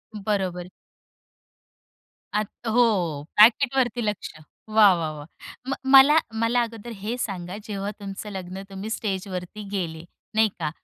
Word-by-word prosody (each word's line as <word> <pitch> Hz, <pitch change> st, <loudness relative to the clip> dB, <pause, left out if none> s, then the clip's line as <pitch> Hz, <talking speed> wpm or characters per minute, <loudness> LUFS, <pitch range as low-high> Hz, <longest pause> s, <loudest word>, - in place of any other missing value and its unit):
बरोबर. 190 Hz, -4 st, -2 dB, 1.7 s
आत 210 Hz, -1 st, -1 dB, 0.2 s
हो, 200 Hz, -11 st, +2 dB
पॅकेटवरती 245 Hz, +2 st, +5 dB
लक्ष. 210 Hz, -2 st, -3 dB, 0.4 s
वाह, 215 Hz, -3 st, +6 dB
वाह, 160 Hz, -2 st, -2 dB
वाह. 150 Hz, -1 st, -9 dB, 0.4 s
म -, -, +1 dB, 0.2 s
मला 275 Hz, +3 st, +8 dB, 0.2 s
मला 240 Hz, +2 st, +2 dB
अगोदर 230 Hz, 0 st, -7 dB
हे 235 Hz, +4 st, -2 dB
सांगा, 185 Hz, -5 st, -4 dB
जेव्हा 200 Hz, 0 st, -3 dB
तुमचं 200 Hz, +1 st, -7 dB
लग्न, 190 Hz, 0 st, -6 dB
तुम्ही 195 Hz, +3 st, -6 dB
स्टेजवरती 195 Hz, -2 st, -4 dB
गेले 165 Hz, -4 st, -3 dB, 0.3 s
नाही 220 Hz, -1 st, +4 dB
का. 155 Hz, -2 st, -1 dB
205 Hz, 120 wpm, -24 LUFS, 180-225 Hz, 1.7 s, मला